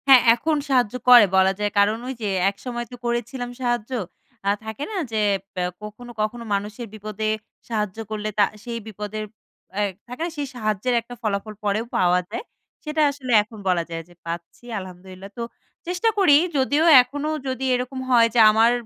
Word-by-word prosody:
হ্যাঁ। 265 -2 +9
এখন 310 +6 0
সাহায্য 250 -4 +2
করে 240 -4 +10
বলা 190 0 +5
যায়। 205 0 0
কারণ, 205 +2 +4
ওইযে 240 -5 -4 0.2
একসময় 240 +4 -5
তো - - -7
করেছিলাম 240 +1 -2
সাহায্য। 240 -1 -1 0.6
আ - - +5 0.2
থাকে 220 +5 -5
না - - -5 0.2
যে 220 - -1 0.4
ব্যা 180 -1 0 0.2
কখনো, 230 +3 -9
কখনো, 235 +3 -2
মানুষের 210 +4 -3
বিপদে 215 0 -4 0.4
সাহায্য 210 -3 -2
করলে, 215 0 -3
তা - - +7 0.2
সেই 235 -1 -4
বিপদের 215 0 -5 0.6
এয় 205 -1 +1 0.2
থাকে 250 +5 -8
না? - - -2
সেই 285 -1 -2
সাহায্যের 215 +1 -1
একটা 245 +1 -11
ফলাফল 215 -1 -2
পরেও 210 +2 0
পাওয়া 180 0 +4
যায়, - - -5 0.4
সেটা 305 0 -1
আসলে 265 -3 -6
এখন 220 +1 -14
বলা 175 -2 +2
যায় 165 0 -4
যে - - -17
পাচ্ছি, 170 +6 -7 0.2
আলহামদুলিল্লাহ। 185 +1 -10
তো - - -4 0.5
চেষ্টা 360 +6 +1
করি 365 -8 +6 0.2
যদিও 285 +4 +2 0.2
এখনো 285 +4 -4 0.2
যদি 260 0 -3
এরকম 250 +1 -2
হয় 235 -2 +6
যে - - +5
আমার 225 +2 +5
225 Hz, 170 wpm, -23 LUFS, 205-250 Hz, 0.6 s, করে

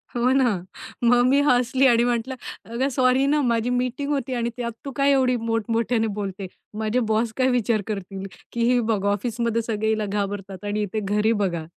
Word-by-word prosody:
हो 245 +1 +2
ना, 260 -2 +3 0.5
मग 245 +1 +5
मी 275 +2 +4
हसली 255 +1 +3
आणि 235 -1 +4
म्हटलं, 240 +2 -1 0.3
"अगं! 240 +4 -1
सॉरी 255 0 +3
ना 295 +1 +2
माझी 235 -2 +1
मीटिंग 255 +3 -1
होती 270 -2 -1
आणि 235 -1 -1
त्यात 235 -1 -3
तू 275 - -4
काय 280 +1 +3
एवढी 260 -2 +3
मोठ-मोठयाने 225 0 0
बोलते. 195 -1 -4 0.3
माझे 220 +3 0
बॉस 220 +1 +1
काय 260 0 +3
विचार 225 -2 +1
करतील, 195 -2 -5 0.3
की 235 - -1
ही 250 - +3
बघा 215 -4 0
ऑफिसमध्ये 230 +2 -1
सगळे 220 -1 -2
हिला 215 -1 0
घाबरतात 200 -1 -4
आणि 205 +1 -1
इथे 210 +2 -3
घरी 210 +2 +1
बघा." 170 -4 -2
230 Hz, 185 wpm, -23 LUFS, 210-250 Hz, 0.5 s, मग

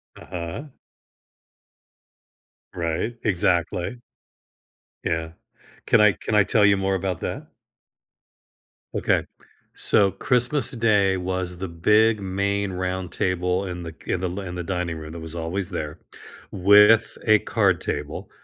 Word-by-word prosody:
Uh-huh. 85 - -7 2.1
Right, 85 +7 -2
exactly. 90 +2 0 1.0
Yeah. 80 -1 -2 0.5
Can 115 - +4
I 105 -1 +6
can 110 - -3
I 100 - +6
tell 105 -1 +3
you 100 -1 +4
more 95 0 0
about 95 -2 -2
that? - - -5 1.5
Okay, - - +1 0.6
so, 100 -1 +5
Christmas 125 0 +1
Day 105 -5 +2
was 90 -1 -3
the 95 +1 -4
big, 105 +6 +3
main 100 +1 -1
roundtable 90 0 -2
in 90 -1 -6
the 80 - -6
k 80 - -6
in 90 - -2
the 90 - -1
l 90 - -5
in 90 -2 -6
the 90 - -4
dining 85 -2 -3
room- 80 0 -8
that 85 - -8
was 80 +1 -7
always 85 +3 -3
there- 75 +1 -5 0.5
with 105 +4 +5
a 110 -1 +6
card 100 -7 +1
table, - - -5
95 Hz, 130 wpm, -23 LUFS, 85-105 Hz, 2.1 s, I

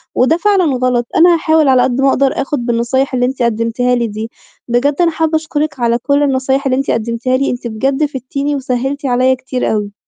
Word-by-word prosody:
وده 300 +7 +3
فعلًا 400 0 +2
غلط، 250 -1 0
أنا 345 +1 +6
هاحاول 315 -2 +2
على 260 -2 +4
قدّ 255 +1 0
ما 270 - +4
أقدر، 270 0 +1
آخد 275 -3 -3
بالنصايح 240 +3 0
اللي 245 -1 +1
أنتِ 260 +1 -3
قدمتيها 235 +2 0
لي 240 -1 -1
دي، 215 +1 -6 0.4
بجد 250 +4 +1
أنا 340 -1 +3
حابة 320 0 -1
أشكرِك 310 -2 -2
على 235 -1 +1
كل 280 +4 +1
النصايح 270 0 0
اللي 255 -1 +1
أنتِ 275 - -1
قدمتيها 235 +3 -1
لي، 275 - 0
أنتِ 245 0 -5
بجد 270 +6 0
فِدتيني 280 +1 -3
وسهلتِ 270 +1 -3
علي 255 0 +2
كتير 255 0 -3
أوي. 205 -1 -3
260 Hz, 205 wpm, -15 LUFS, 240-285 Hz, 0.4 s, أنا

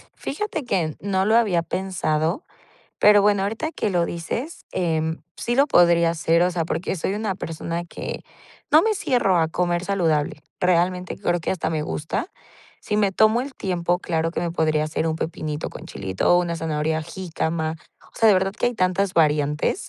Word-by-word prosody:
Fíjate 320 -2 -4
que, 175 -9 0
mm, - - -7
no 190 0 0
lo 220 +2 +3
había 205 -7 +3
pensado, 175 - -1 0.6
pero 210 0 +7
bueno, 205 -1 +3
ahorita 225 +10 -2
que 215 - -2
lo 175 -3 +1
dices, 225 - -5
em, 160 -2 -1 0.2
sí 240 - -1
lo 280 +3 +4
podría 170 - +5
hacer, 165 0 +2
o 180 - +2
sea, 170 -2 -1
porque 165 +3 -2
soy 190 +2 -2
una 210 -2 -2
persona 165 0 -4
que - - -6 0.5
no 310 +2 +7
me 440 0 +2
cierro 240 - +2
a 160 - +2
comer 175 +1 -1
saludable. 160 -7 0 0.2
Realmente 180 0 +1
creo 175 0 0
que 165 - -2
hasta 185 - -2
me 155 -2 -1
gusta. 155 - -3 0.5
Si 210 - -2
me 205 -2 +2
tomo 220 +4 +4
el 270 +1 -7
tiempo, 180 -3 -1
claro 165 -2 -1
que - - -3
me 170 0 -2
podría 155 -2 +1
hacer 155 +1 -1
un 160 - -1
pepinito 155 -2 -4
con - - -10
chilito 95 - 0
o - - +5
una 170 -1 -2
zanahoria 160 -1 -1
jícama. 160 -2 -3 0.4
O - - -23
sea, 225 - +5
de 210 - +7
verdad 190 +1 +1
que 245 - 0
hay 245 - -2
tantas 185 0 +1
variantes 150 - +1
175 Hz, 190 wpm, -23 LUFS, 160-200 Hz, 0.6 s, pero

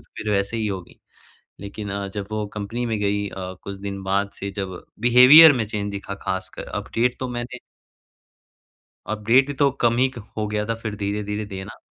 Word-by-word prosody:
फ़िर 110 - -4
वैसे 100 +3 0
ही 110 -1 -1
होगी। 95 -3 -6 0.6
लेकिन 100 +1 -7
अ, 100 0 -3
जब 100 0 -6
वो 110 0 -2
कंपनी 105 +4 -3
में 115 -2 -1
गई 100 0 0
अ, - - -16 0.3
कुछ 100 0 -6
दिन 100 0 -5
बाद 100 +1 0
से 100 0 -4
जब 95 -3 -5 0.2
बिहेवियर 130 +7 +9
में 120 -4 -1
चेंज 105 -1 -3
दिखा 100 0 -5
ख़ासकर 95 -1 -4
अपडेट 120 +2 -1
तो 130 - -2
मैंने 125 +1 -5 1.5
अपडेट 115 +6 +3
ही 145 - -3
तो 140 0 +3
कम 115 -1 +3
ही 130 +1 +3 0.3
हो 110 -1 -1
गया 105 0 -1
था 115 - -1
फ़िर 110 -2 -4
धीरे-धीरे 105 +1 -3
देना। 95 0 -8
105 Hz, 180 wpm, -23 LUFS, 100-120 Hz, 1.5 s, बिहेवियर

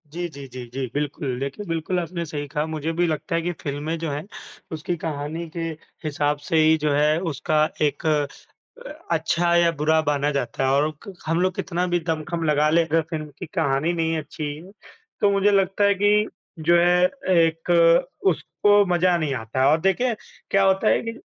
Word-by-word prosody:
जी, 175 +2 -3
जी, 140 -3 -10
जी, 125 -1 -8
जी। 135 0 -2
बिल्कुल, 140 -3 -3
देखिए 140 +9 -5
बिल्कुल 165 +1 -1
आपने 170 0 -4
सही 145 -2 -5
कहा, 150 +1 -2
मुझे 160 0 -3
भी 175 +2 +1
लगता 160 +1 -2
है 165 - +1
कि 175 +2 -2
फ़िल्में 145 +3 -3
जो 165 -1 -3
हैं, 145 +2 -4 0.5
उसकी 160 +2 -3
कहानी 160 +1 -4
के - - -3 0.4
हिसाब 145 -1 0
से 165 - +2
ही 160 0 +5
जो 150 -1 0
है 150 +2 +3
उसका 155 +2 +1 0.2
एक 150 +1 0
अ, 150 - -3 0.3
अच्छा 170 +1 +1
या 170 0 +4
बुरा 160 +1 +3
बाना 145 -1 0
जाता 135 -2 -2
है 130 - +2
और 145 +3 +2 0.2
क 200 - -7
हम 165 +1 0
लोग 185 -1 +1
कितना 180 -1 -2
भी 175 0 +1
दमखम 165 +1 -2
लगा 150 -1 +3
लें 165 +2 +4
अगर 165 +1 +2
फ़िल्म 155 -2 -4
की 180 - -5
कहानी 155 -1 +1
नहीं 165 -1 0
अच्छी 155 0 -6
है, 170 +6 -12 0.5
तो 205 - +5
मुझे 200 +1 +3
लगता 195 0 +2
है 200 0 +5
कि 205 +2 +3 0.3
जो 170 +2 +4
है 175 +1 +4 0.3
एक 165 0 +2 0.6
उसको 205 +3 +3
मज़ा 180 -1 +2
नहीं 155 -4 -1
आता 115 +1 -4
है। - - +4
और 155 - +3
देखें 210 +7 +1 0.4
क्या 195 0 +4
होता 195 +2 +3
है - - +3
कि 230 0 -6
160 Hz, 195 wpm, -23 LUFS, 150-175 Hz, 0.6 s, ही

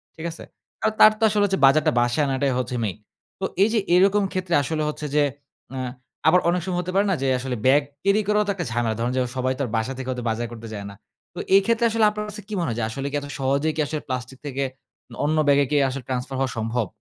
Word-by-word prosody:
ঠিক 160 - -7
আছে? 165 - -10 0.4
আর 220 - +3
তার 215 - +9
তো - - -1
আসলে 210 -1 +2
হচ্ছে 195 -4 0
বাজারটা 155 +3 +4
বাসায় 120 +5 +1
আনাটাই 135 0 0
হচ্ছে 125 0 -3
মেইন। 100 -2 -2 0.4
তো 190 - -1 0.2
এই 210 - +3
যে 225 - +3 0.2
এরকম 200 +3 +4
ক্ষেত্রে 185 -2 0
আসলে 155 +1 -2
হচ্ছে 150 0 -5
যে 150 - +5 0.5
আ - - -3 0.5
আবার 180 +3 +6
অনেক 180 0 +1
সময় 180 -1 -1
হতে 180 - -5
পারে 200 +1 +4
না - - +2
যে 135 - 0
আসলে 125 -1 -3
ব্যাগ 140 +3 +6 0.2
ক্যারি 200 +2 +3
করাও 210 0 +3
তো - - +2
একটা 175 -4 -3
ঝামেলা। 115 -2 0
ধরুন 120 +2 0 0.3
সবাই 130 +1 +1
তো - - +1
বাসা 110 +4 -2
থেকে 130 -1 -6
হয়তো 125 -1 -4
বাজার 115 +1 -2
করতে 115 -1 -9
যায় 100 -1 -6
না। 100 - -11 0.4
তো - - -7 0.2
এই 200 - +7
ক্ষেত্রে 230 0 +2
আসলে 225 -1 +3
আপনার 210 0 -4
কাছে 210 0 -8
কি 215 - -7
মনে 170 - -1
হয় 115 - -3
যে 115 - -1
আসলে 135 +4 -5
কি - - -3
এত 145 - -7
সহজেই 140 +4 +1
কি 155 - 0
আসলে 155 -1 -3
প্লাস্টিক 130 0 -4
থেকে 140 -1 -2 0.6
অন্য 155 +1 +1
ব্যাগে 140 0 +5
কি - - +2
আসলে 130 0 -5
ট্রান্সফার 130 +1 -3
হওয়া 135 -2 0
সম্ভব? 115 -1 -1
145 Hz, 245 wpm, -23 LUFS, 125-185 Hz, 0.6 s, তার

